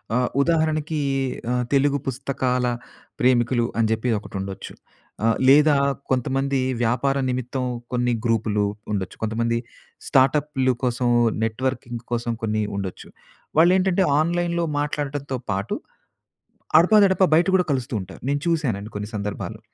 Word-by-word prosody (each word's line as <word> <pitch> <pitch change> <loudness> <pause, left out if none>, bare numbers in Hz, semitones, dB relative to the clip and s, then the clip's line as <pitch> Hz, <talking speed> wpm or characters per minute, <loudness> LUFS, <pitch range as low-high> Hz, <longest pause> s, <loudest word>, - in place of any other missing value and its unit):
ఆహ్, 125 0 +1
ఉదాహరణకి 155 -1 +1 0.5
ఆహ్, 125 0 0
తెలుగు 140 +1 +3
పుస్తకాల 130 -1 -1 0.5
ప్రేమికులు 120 -1 +3
అని 115 - +3
చెప్పి 110 +2 0
ఒకటుండొచ్చు. 95 -2 -6 0.5
ఆహ్, 115 - +3
లేదా 150 +1 +6 0.4
కొంతమంది 135 +2 0 0.2
వ్యాపార 125 +4 +1
నిమిత్తం 125 +1 -2 0.3
కొన్ని 125 0 +1
గ్రూపులు 110 -2 +1 0.3
ఉండొచ్చు. 95 -3 -3
కొంతమంది 115 +1 0 0.5
స్టార్టప్‌లు 135 -1 +2
కోసం 125 0 0 0.4
నెట్వర్కింగ్ 120 +1 -3
కోసం 120 0 -1
కొన్ని 110 -1 0
ఉండొచ్చు. 95 -2 -5 0.5
వాళ్లేంటంటే 185 +2 +4
ఆన్‌లైన్‌లో 170 +1 0
మాట్లాడటంతో 145 -2 -3
పాటు 100 +3 -2 1.0
అడపాదడపా 190 +1 +5
బయట 170 - +3
కూడా 180 - +1
కలుస్తుంటారు. 120 -7 -4
నేను 145 +1 0
చూసానండి 120 -11 -1
కొన్ని 105 0 -4
సందర్భాల్లో. 105 +1 -4
130 Hz, 110 wpm, -23 LUFS, 115-145 Hz, 1.0 s, లేదా